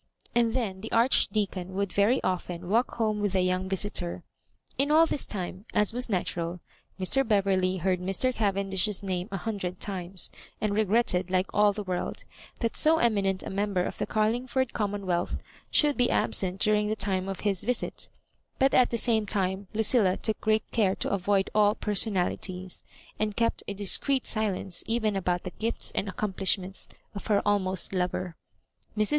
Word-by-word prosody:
And 235 -1 +2
then 200 -7 -2
the 225 - -7
Archdeacon 205 -6 +1
would 200 -1 -1
very 210 +6 +2
often 180 -1 -3
walk 235 +4 +1
home 215 -2 0
with 205 -2 -1
the 190 - +2
young 185 +1 0
visitor. 190 -2 -1 0.5
In 280 +1 +1
all 315 +2 +6
this 300 - -3
time, 185 0 -5
as 210 +1 +3
was 250 0 -1
natural, 175 -3 -2 0.4
Mr. 230 +9 +4
Beverley 195 -4 +1
heard 185 +1 0
Mr. 195 +8 +1
Caven 200 -3 -1
dish's 195 +1 0
name 185 -1 -3
a 195 - -2
hundred 185 -3 -4
times, 185 -2 -4 0.3
and 215 -1 -1
regretted, 205 -3 +2
like 185 0 0
all 205 0 +4
the 210 +1 -5
world, 180 -2 -4 0.4
that 230 -2 -1
so 320 +1 +5
eminent 200 -7 +1
a - - -6
member 195 -2 0
of - - -5
the - - -1
Carling 220 +4 0
ford 260 -1 -1
commonwealth 200 -4 -1 0.3
should 295 -2 +3
be 245 -1 +3
absent 190 0 0
during 210 0 +3
the 215 - 0
time 195 -2 -1
of 195 - -5
his 195 -3 0
visit; 250 +1 -2 0.5
but 270 0 +3
at 250 - +5
the 235 - -1
same 220 -2 +2
time, 195 -1 -1
Lucilla 215 -3 +3
took 220 -2 -2
great 215 0 +2
care 200 -5 +2
to - - -3
avoid 195 0 +1
all 210 0 +4
personalities, 185 -3 -1 0.4
and 210 -1 -1
kept 230 0 0
a 205 - -3
discreet 250 +7 +3
silence 200 -4 0
even 220 -2 0
about 180 -2 -1
the 185 - -6
gifts 230 +1 +1
and 200 - -2
accomplishments 190 -1 -1 0.2
of 200 - -7
her 210 -2 +3
almost 190 -3 0
lover. 180 -1 -2 0.6
Mrs. 215 -1 +2
200 Hz, 175 wpm, -27 LUFS, 185-220 Hz, 0.6 s, all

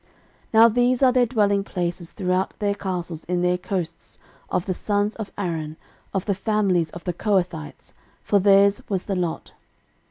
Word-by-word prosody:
13:006:054 - - -34 0.5
Now 225 +1 +9
these 245 +3 +2
are 255 - +6
their 250 -1 +3
dwelling 205 -4 +2
places 175 -3 -4
throughout 185 -1 -1
their 205 -1 0
castles 180 -5 -4
in 175 0 -1
their 180 0 +2
coasts, 175 -3 -5 0.3
of 180 - -1
the 185 - -1
sons 205 +3 -1
of 220 -3 -6
Aaron, 160 -5 -3 0.3
of 195 -2 -2
the 200 - +1
families 195 -5 +1
of 175 +1 -10
the 180 - -2
Kohathites: 175 -6 -2 0.3
for 205 - +3
theirs 200 +1 +5
was 190 -3 -1
the 195 - -3
lot. 175 -3 -3
190 Hz, 170 wpm, -23 LUFS, 175-205 Hz, 0.5 s, Now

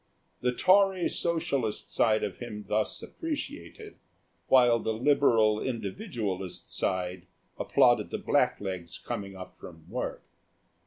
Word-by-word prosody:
The 125 - +1
Tory 190 +5 +4
Socialist 140 -9 -1
side 110 -2 +3
of - - -3
him 105 -4 -7
thus 110 +2 -1
appreciated, 330 +6 -6 0.5
while 120 -3 +5
the 110 -1 -2
Liberal 115 -5 +3
Individualist 105 - -4
side 90 -1 -2 0.3
applauded 120 -4 +3
the - - -3
blacklegs 95 -4 -1
coming 100 -5 -5
up 90 -1 -10
from 80 -3 -12
work. - - -4
110 Hz, 110 wpm, -29 LUFS, 100-140 Hz, 0.5 s, while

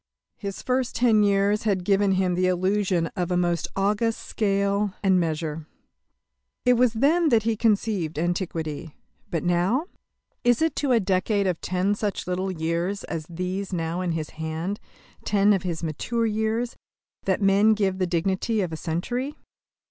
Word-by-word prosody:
His 200 -2 -5
first 255 -1 0
ten 230 -3 +4
years 200 +1 +3
had 195 -4 0
given 195 0 +3
him 185 -1 +1
the 185 +1 +2
illusion 185 -1 +1
of 180 -3 -1
a 180 - +1
most 175 -2 0
august 210 +3 0
scale 200 -1 0
and 190 -2 +4
measure. 160 -2 -2 1.0
It 250 - +6
was 245 -1 +3
then 305 +8 +3
that 230 -4 +3
he 225 0 +1
conceived 205 -7 0
Antiquity. 165 -3 -3 0.3
But 165 - -2
now! 180 - +1 0.6
Is 245 -1 +4
it 320 -1 +1
to 280 -3 +1
a 235 - +5
decade 195 +1 +1
of 180 -3 -1
ten 185 +2 0
such 205 -1 -2
little 185 +1 -2
years 170 +4 -2
as 155 -2 -5
these 185 +3 -3
now 170 0 -2
in 175 -2 -1
his 155 -2 -4
hand 160 +5 -4 0.4
ten 205 0 +3
of 195 - +1
his 170 -2 -4
mature 225 +9 -1
years 220 +2 -1 0.5
that 190 -1 +1
men 205 +2 +4
give 195 -3 0
the 185 - +1
dignity 190 +5 0
of 175 -4 -3
a - - -3
century? 245 - -3
195 Hz, 165 wpm, -25 LUFS, 175-215 Hz, 1.0 s, It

